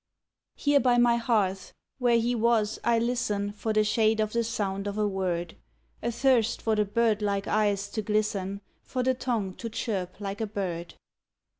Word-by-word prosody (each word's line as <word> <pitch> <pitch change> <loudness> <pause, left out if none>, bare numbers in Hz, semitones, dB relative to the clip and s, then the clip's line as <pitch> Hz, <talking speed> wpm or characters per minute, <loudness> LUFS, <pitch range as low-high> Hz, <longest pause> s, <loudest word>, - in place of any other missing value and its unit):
Here 285 -1 +3
by 250 -2 +3
my 240 -1 +4
hearth 200 -6 0 0.3
where 240 -2 +4
he 235 +2 0
was 225 -2 +1
I 235 -1 +3
listen 230 -4 -1
For 210 +2 -3
the 215 0 +3
shade 220 +1 +2
of 215 -1 0
the 235 0 +1
sound 205 -4 -2
of 200 +1 -4
a 210 -1 +2
word, 180 -4 -2 0.5
Athirst 235 0 +2
for 220 -1 0
the 210 0 +2
birdlike 205 -2 +1
eyes 205 -2 +1
to 215 - -3
glisten, 205 -2 -1 0.2
For 255 -1 -3
the 260 +1 +3
tongue 235 -7 -2
to 230 - -5
chirp 195 -5 -3
like 200 +1 -4
a 220 - -1
bird. 180 -5 -4
215 Hz, 170 wpm, -27 LUFS, 200-235 Hz, 0.5 s, my